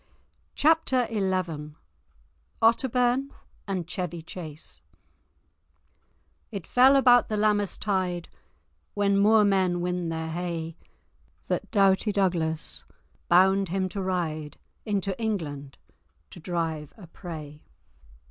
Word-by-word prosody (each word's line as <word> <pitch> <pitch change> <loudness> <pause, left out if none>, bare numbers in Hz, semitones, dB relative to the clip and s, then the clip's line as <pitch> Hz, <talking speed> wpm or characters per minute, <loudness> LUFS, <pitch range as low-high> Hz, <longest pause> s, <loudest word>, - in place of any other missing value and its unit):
*Chapter 295 -5 +3
XI* 185 -7 -2 0.9
*Otterbourne 250 +3 +2 0.4
and 190 -3 -2
Chevy 175 -1 -4
Chase* 160 -3 -8 1.7
"It 200 -6 -6
fell 260 +2 +5
about 245 -3 +5
the 215 - -1
Lammas 205 -2 +1
tide, 185 -4 -1 0.7
When 200 -1 +2
moor 210 +2 +5
men 190 -3 +2
win 180 -1 -2
their 160 0 -3
hay, 165 -1 -4 0.7
The - - +1
doughty 195 0 +3
Douglas 170 -5 0 0.5
bound 190 +2 +4
him 190 +1 0
to 195 +2 -4
ride 160 -5 -3 0.3
Into 195 -2 -1
England, 145 -11 -3 0.5
to - - -11
drive 160 -3 -3
a 200 - -11
prey." 155 -4 -9
185 Hz, 100 wpm, -26 LUFS, 165-205 Hz, 1.7 s, fell